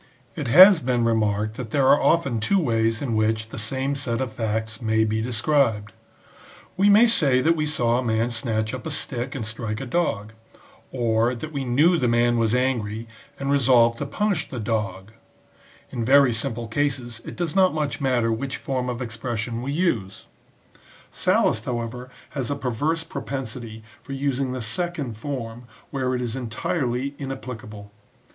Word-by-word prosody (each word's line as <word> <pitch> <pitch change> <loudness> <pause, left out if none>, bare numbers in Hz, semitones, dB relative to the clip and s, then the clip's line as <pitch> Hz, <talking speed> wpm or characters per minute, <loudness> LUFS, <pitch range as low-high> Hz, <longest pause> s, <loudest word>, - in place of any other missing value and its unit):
It 150 -5 -4
has 185 - +9
been 125 -4 0
remarked 110 -1 0
that 125 -4 -5
there 135 +2 +2
are 145 - +5
often 140 -9 +2
two 195 - +2
ways 115 -7 +1
in 120 -5 -1
which 110 0 0
the 115 - -7
same 130 +5 -1
set 130 -4 -2
of 130 -4 -3
facts 110 0 -2
may 110 -1 +2
be 110 0 0
described: 115 -2 +1 0.4
" 180 -1 -23
we 195 +2 +4
may 210 +4 +7
say 150 - +3
that 165 +6 +3
we 155 -1 -1
saw 120 -5 +1
a - - -2
man 115 0 0
snatch 110 -1 -2
up 130 +4 -5
a - - -3
stick 135 -3 -3
and 120 -5 -4
strike 110 -1 -4
a 135 - -5
dog; 115 -7 -1 0.6
or, 120 -1 +1
that 155 +6 -7
we 140 -3 -3
knew 155 +8 +3
the 125 - +1
man 120 0 +2
was 115 +1 +2
angry 115 -4 -1 0.3
and 140 0 -1
resolved 120 -4 +4
to 145 - -3
punish 200 -2 -1
the 125 - -5
dog;" 105 -3 -3 0.8
in 120 -3 -3
very 135 0 +5
simple 115 0 -3
cases 120 -2 -2
it - - -8
does 175 -1 -3
not 190 -1 +5
much 150 -2 -2
matter 125 -4 +1
which 130 +5 -3
form 130 -2 -3
of 125 +1 -3
expression 115 0 -4
we 135 +3 -3
use. 125 - -1 0.9
Sallust, - - +1
however, 125 +1 -4 0.2
has 130 -4 -3
a 145 - -1
perverse 145 +5 -1
propensity 125 -9 -6 0.2
for 135 - -8
using 135 -1 -1
the 130 -2 -4
second 145 +1 -3
form 120 -1 -6 0.3
where 130 -2 -1
it 125 - -2
is 120 0 -3
entirely 130 +2 -2
inapplicable. 120 -6 -7
125 Hz, 175 wpm, -24 LUFS, 115-140 Hz, 0.9 s, has